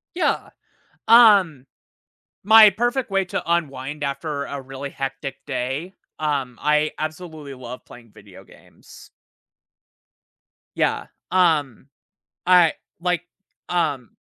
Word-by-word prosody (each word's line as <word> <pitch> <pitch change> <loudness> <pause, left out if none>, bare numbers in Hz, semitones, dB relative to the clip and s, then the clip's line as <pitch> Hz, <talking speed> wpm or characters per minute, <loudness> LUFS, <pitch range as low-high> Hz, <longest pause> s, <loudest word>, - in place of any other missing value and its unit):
Yeah. 360 - 0 0.6
Um, 200 - +6 0.8
my 220 +1 +8
perfect 240 +4 -2
way 195 -1 +1
to 180 - -4
unwind 145 -3 -2
after 140 +1 -3
a 140 -1 -6
really 135 +1 -7
hectic 135 0 -5
day, 140 +10 -4 0.3
um, 140 -5 -2
I 150 +1 +2
absolutely 155 -2 -6
love 125 -1 -10
playing 115 -2 -15
video 100 -3 -15
games. - - -18 1.7
Yeah. - - 0 0.2
Um, 155 -9 +1 0.6
I 180 -3 +5 0.3
like, 180 -1 0 0.5
um 145 - -1
150 Hz, 100 wpm, -22 LUFS, 135-180 Hz, 1.7 s, my